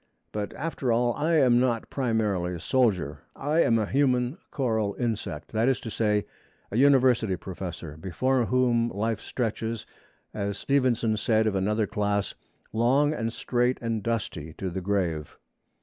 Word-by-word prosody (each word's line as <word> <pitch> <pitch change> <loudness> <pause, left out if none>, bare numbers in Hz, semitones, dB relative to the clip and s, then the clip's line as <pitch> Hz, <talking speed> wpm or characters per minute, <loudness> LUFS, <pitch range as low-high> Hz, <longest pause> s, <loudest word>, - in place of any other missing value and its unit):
But 105 -1 -3
after 145 -5 -2
all 120 +1 +2
I 160 +6 +1
am 125 -5 +5
not 120 -3 0
primarily 105 -9 0
a - - -6
soldier: 90 - +1 0.2
I 150 +4 0
am 115 - +4
a 110 - +1
human 130 - +1
coral 110 -7 0
insect 105 - -3
that 115 +3 +2
is 130 - +1
to 115 - -6
say, 105 -2 +1 0.5
a 105 - -1
university 130 -7 +4
professor, 90 -4 -7
before 125 +9 0
whom 120 -2 +2
life 110 +1 -1
stretches, 115 -2 -3 0.5
as 100 -1 -2
Stevenson 120 -5 +1
said 110 0 +2
of 110 - +1
another 105 +3 +1
class, 105 -1 -1 0.4
'long 135 +7 +3
and 115 -5 -2
straight 125 +2 0
and 115 -2 -2
dusty 100 -8 -3
to 95 +2 -4
the 95 +2 -4
grave.' 90 -6 -1
115 Hz, 150 wpm, -27 LUFS, 100-125 Hz, 0.5 s, am